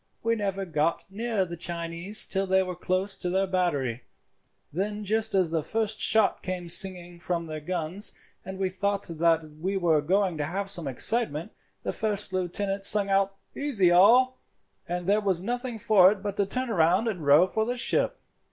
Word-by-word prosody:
"We 230 0 +1
never 195 -2 -3
got 160 -1 -1
near 220 -1 -2
the 170 -1 -7
Chinese 170 +4 +3
till 195 0 -1
they 190 0 +2
were 180 -1 -6
close 185 +3 0
to 180 - -2
their 190 +2 0
battery. 145 -11 -2 0.7
Then 205 +5 -3
just 220 +1 0
as 185 -4 +2
the 165 -1 0
first 220 +4 -2
shot 220 -3 +3
came 180 -2 -5
singing 175 -1 +2
from 170 -1 -3
their 155 -1 -6
guns, 175 +4 0 0.3
and 190 +1 -8
we 190 0 -1
thought 200 +2 -2
that 165 -1 +1 0.2
we 190 +4 -2
were 165 -5 +2
going 185 +1 0
to 145 - -1
have 195 +5 -3
some 170 -7 -2
excitement, 175 - -1 0.3
the - - -3
first 210 -3 -1
lieutenant 195 +2 -3
sung 200 0 +5
out 195 0 +1 0.2
'Easy 220 -12 +2
all,' 250 +8 +4 0.5
and 175 0 -4
there 205 +3 +2
was 190 -3 0
nothing 245 +2 -4
for 200 -3 +5
it 205 -2 -6
but 205 -1 -4
to 200 - 0
turn 255 +4 -3
round 180 +3 +2
and 205 -5 -3
to - - -9
row 145 +5 +5
for 220 +4 -2
the 245 +3 -3
ship. - - 0
190 Hz, 190 wpm, -26 LUFS, 175-210 Hz, 0.7 s, sung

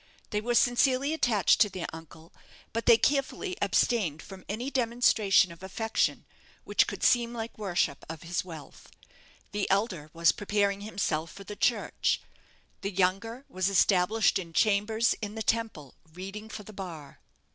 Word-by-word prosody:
They 210 - 0
were 240 +2 -1
sincerely 260 +4 +3
attached 230 - +3
to 210 - +5
their 185 -3 -5
uncle; 160 0 -12 0.4
but 230 +1 -3
they 230 - +8
carefully 285 - 0
abstained 180 -11 +1
from 190 -2 -11
any 240 +7 -3
demonstration 230 -7 +3
of 170 - -13
affection 220 +4 -1 0.4
which - - +2
could - - -6
seem 240 -1 +3
like 225 0 -5
worship 180 -9 -1
of 160 -1 -7
his 175 +1 -2
wealth. 160 -5 -11 0.6
The 205 -1 -2
elder 190 -6 0
was 165 -2 +4
preparing 200 -1 0
himself 170 -6 -2
for 200 - -11
the 210 +2 -8
Church; 225 0 +1 0.6
the 200 - -2
younger 195 +7 -1
was 185 +1 -1
established 195 +2 +3
in 170 -3 -8
chambers 220 +4 +2
in 210 0 -5
the 220 - -3
Temple, 220 - -2 0.2
reading 195 +5 -8
for 215 - -7
the 215 - -12
bar. 165 -8 -8
205 Hz, 155 wpm, -28 LUFS, 180-230 Hz, 0.6 s, they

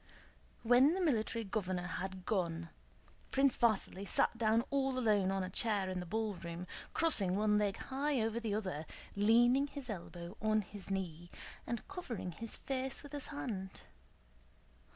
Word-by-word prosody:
When 250 +7 +6
the - - -1
Military 230 -8 +1
Governor 185 -4 -2
had 185 +1 -4
gone, 170 -5 -1 0.6
Prince 270 -1 +4
Vasíli 200 -3 +1
sat - - +3
down 230 0 +3
all 270 -2 +1
alone 210 -6 +3
on 195 -1 0
a 185 - -3
chair 200 -2 +1
in 185 - -2
the 180 - -6
ballroom, 180 -4 -3 0.3
crossing 200 - +3
one 210 0 +3
leg 200 -2 0
high 275 +1 -1
over 225 +1 0
the 220 -3 -1
other, 185 -8 -3 0.3
leaning 240 +6 +5
his 275 -4 -5
elbow 175 -1 -7
on 215 0 +3
his 200 0 -8
knee 175 -3 -3 0.4
and 235 -1 -3
covering 305 - -5
his 225 +6 -5
face 265 +1 -3
with 285 - -10
his 290 -2 -4
hand. 210 -10 -5
215 Hz, 150 wpm, -35 LUFS, 185-250 Hz, 0.6 s, When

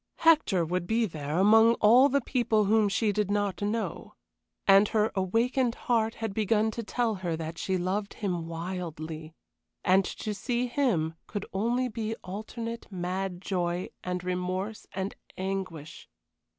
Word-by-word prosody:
Hector 300 - +4
would 175 +1 -2
be 225 +1 +2
there, 155 -4 -4
among 220 +4 +6
all 245 +6 +6
these 280 -1 +1
people 225 -5 +2
whom 215 0 +3
she 210 +2 +1
did 205 -1 0
not 205 -3 0
know. 215 +2 -3 0.5
And 195 +1 +7
her 215 0 +1
awakened 230 +6 +1
heart 225 -2 0
had 225 -3 -4
begun 220 +1 +2
to 230 - -4
tell 230 +1 0
her 170 -3 -1
that 160 0 -6
she 190 -1 0
loved 195 +3 -2
him 175 -5 -2
wildly, 165 -2 -5 0.5
and 190 +1 +5
to 210 +3 -4
see 240 +5 -1
him 235 - +1
could 205 -1 -4
only 240 +6 +1
be 225 -1 -3
alternate 230 +4 -6
mad 185 0 -3
joy 175 -1 -1
and 180 0 -3
remorse 185 +3 -3
and 190 +1 -3 0.2
anguish. 185 -5 -5
200 Hz, 150 wpm, -28 LUFS, 180-225 Hz, 0.5 s, And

